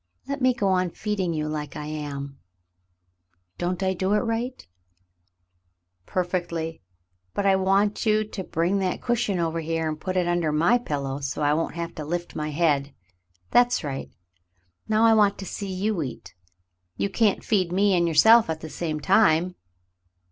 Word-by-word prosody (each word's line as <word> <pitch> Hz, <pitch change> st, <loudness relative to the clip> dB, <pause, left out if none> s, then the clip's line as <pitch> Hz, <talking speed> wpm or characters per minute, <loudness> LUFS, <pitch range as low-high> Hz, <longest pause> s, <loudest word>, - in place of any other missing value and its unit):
Let 280 Hz, 0 st, -3 dB
me 255 Hz, 0 st, +5 dB
go 200 Hz, -4 st, 0 dB
on 185 Hz, -1 st, +2 dB
feeding 195 Hz, -1 st, -2 dB
you 155 Hz, -2 st, -2 dB
like 150 Hz, -1 st, -4 dB
I 150 Hz, -, -5 dB
am. 140 Hz, -2 st, -6 dB, 1.2 s
Don't 180 Hz, +2 st, -1 dB
I 190 Hz, 0 st, +1 dB
do 190 Hz, +2 st, 0 dB
it 210 Hz, -, +3 dB
right.? 235 Hz, -, -3 dB, 0.7 s
" 90 Hz, 0 st, -48 dB
"Perfectly, 175 Hz, -3 st, -2 dB, 0.5 s
but 205 Hz, -, -1 dB
I 195 Hz, -1 st, +5 dB
want 195 Hz, +2 st, +2 dB
you 215 Hz, -1 st, +3 dB
to 210 Hz, -2 st, -6 dB
bring 175 Hz, +4 st, 0 dB
that 185 Hz, -2 st, -1 dB
cushion 235 Hz, -5 st, 0 dB
over 165 Hz, -1 st, -1 dB
here 165 Hz, 0 st, -2 dB
and 155 Hz, 0 st, -4 dB
put 185 Hz, -1 st, -2 dB
it 180 Hz, -1 st, +1 dB
under 175 Hz, -3 st, +1 dB
my 170 Hz, +11 st, +3 dB
pillow 140 Hz, -, -3 dB
so 140 Hz, +1 st, -2 dB
you 145 Hz, -, +3 dB
won't 165 Hz, +1 st, -2 dB
have 170 Hz, 0 st, -4 dB
to 155 Hz, -, -6 dB
lift 175 Hz, +3 st, -4 dB
my 150 Hz, 0 st, -3 dB
head. 145 Hz, -3 st, +1 dB, 0.6 s
That's 245 Hz, -4 st, +4 dB
right. 135 Hz, -, -4 dB, 0.8 s
Now 220 Hz, +1 st, +4 dB
I 225 Hz, -, +6 dB
want 205 Hz, -2 st, +4 dB
to 195 Hz, -, -7 dB
see 200 Hz, +1 st, -5 dB
you 195 Hz, 0 st, -1 dB
eat. 130 Hz, -5 st, -7 dB, 0.6 s
You -, -, 0 dB
can't 205 Hz, 0 st, +1 dB
feed 185 Hz, -5 st, +1 dB
me 195 Hz, +2 st, +3 dB
and 170 Hz, -1 st, +2 dB
yourself 220 Hz, +7 st, +6 dB
at 160 Hz, -1 st, -3 dB
the 160 Hz, -, -8 dB
same 155 Hz, -3 st, -3 dB
time. 180 Hz, -2 st, +3 dB
175 Hz, 175 wpm, -25 LUFS, 155-200 Hz, 1.2 s, I